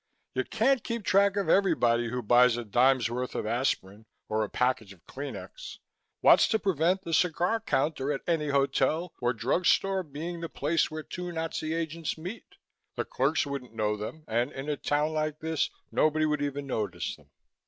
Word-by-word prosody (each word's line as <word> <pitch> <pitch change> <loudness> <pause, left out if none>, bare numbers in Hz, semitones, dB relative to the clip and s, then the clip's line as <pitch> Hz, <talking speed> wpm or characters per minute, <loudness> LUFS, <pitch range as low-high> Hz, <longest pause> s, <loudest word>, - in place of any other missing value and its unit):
You - - 0
can't 270 -4 +2
keep 235 -2 -3
track 200 +1 +4
of 200 - 0
everybody 120 -12 +3
who 125 +1 -3
buys 120 +2 +5
a 120 - -4
dime's 125 +2 +3
worth 125 +1 -3
of - - -2
aspirin 110 -3 -2 0.2
or 110 0 +1
a 105 - -4
package 125 -5 0
of 90 - -24
Kleenex. 145 - -8 0.4
What's - - +7
to 220 - +2
prevent 190 -1 +1
the 165 - -4
cigar 180 +6 +2
counter 145 -7 0
at 140 - -2
any 160 -3 0
hotel 140 +4 +1
or 120 0 +2
drug 125 - 0
store 195 -1 +3
being 165 +2 -6
the 165 - -4
place 155 +4 0
where 155 0 -6
two 180 +2 -6
Nazi 160 -1 -3
agents 165 0 -3
meet. 180 +8 -8 0.4
The - - -2
clerks 140 +5 +1
wouldn't 135 -5 -6
know 105 -1 0
them 110 +9 -7
and 120 +4 0
in 135 +3 -6
a 150 - +1
town 150 +2 0
like 155 -1 -1
this 160 -1 -1 0.2
nobody 155 0 +2
would 150 -1 0
even 145 0 -2
notice 110 -6 -3
them." - - -23
150 Hz, 185 wpm, -28 LUFS, 125-165 Hz, 0.4 s, What's